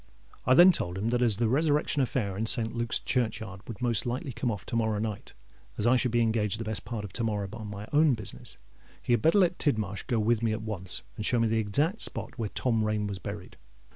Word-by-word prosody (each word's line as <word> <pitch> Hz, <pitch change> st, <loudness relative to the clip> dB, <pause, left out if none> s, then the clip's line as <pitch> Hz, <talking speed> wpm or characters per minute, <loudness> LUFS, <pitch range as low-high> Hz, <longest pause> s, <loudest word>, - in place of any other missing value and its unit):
I 130 Hz, -, +6 dB
then 175 Hz, +5 st, +9 dB
told 90 Hz, -, -2 dB
him 110 Hz, +4 st, -1 dB
that 120 Hz, 0 st, +1 dB
as 115 Hz, -5 st, +4 dB
the 115 Hz, 0 st, +1 dB
resurrection 145 Hz, +2 st, +2 dB
affair 115 Hz, -6 st, -1 dB
in 110 Hz, +3 st, -2 dB
St. 115 Hz, 0 st, 0 dB
Luke's 120 Hz, 0 st, +1 dB
churchyard 110 Hz, -5 st, -2 dB
would 115 Hz, 0 st, -7 dB
most 120 Hz, 0 st, 0 dB
likely 125 Hz, +2 st, -3 dB
come 120 Hz, -, -2 dB
off 105 Hz, -3 st, -4 dB
to 120 Hz, -, -4 dB
morrow 110 Hz, -2 st, +1 dB
night, 105 Hz, -1 st, -4 dB, 0.4 s
and -, -, -12 dB
as 105 Hz, -, 0 dB
I 120 Hz, +2 st, +5 dB
should 125 Hz, 0 st, +2 dB
be 120 Hz, 0 st, +2 dB
engaged 110 Hz, -2 st, 0 dB
the -, -, -2 dB
best 110 Hz, -2 st, -4 dB
part 110 Hz, -2 st, -4 dB
of 95 Hz, -, -10 dB
to 120 Hz, -, -2 dB
morrow 105 Hz, -3 st, -1 dB
on 110 Hz, -2 st, -7 dB
my 105 Hz, +1 st, -7 dB
own 150 Hz, -2 st, +5 dB
business, 110 Hz, -4 st, -8 dB, 0.4 s
he 120 Hz, -, 0 dB
had 120 Hz, -, +2 dB
better 165 Hz, +5 st, +4 dB
let 180 Hz, -2 st, +3 dB
Tidmarsh 110 Hz, -8 st, -1 dB
go 120 Hz, -, +1 dB
with 110 Hz, +1 st, +2 dB
me 115 Hz, -2 st, +1 dB
at 110 Hz, 0 st, -4 dB
once 95 Hz, -5 st, -4 dB
and 105 Hz, -, -3 dB
show 120 Hz, +2 st, +2 dB
me 115 Hz, -, +3 dB
the 110 Hz, 0 st, +1 dB
exact 145 Hz, -, 0 dB
spot -, -, -1 dB
where 110 Hz, -3 st, -2 dB
Tom 115 Hz, -1 st, 0 dB
Rain 105 Hz, -1 st, 0 dB
was 100 Hz, -2 st, -4 dB
buried. 100 Hz, +1 st, -8 dB
115 Hz, 250 wpm, -28 LUFS, 105-125 Hz, 0.4 s, then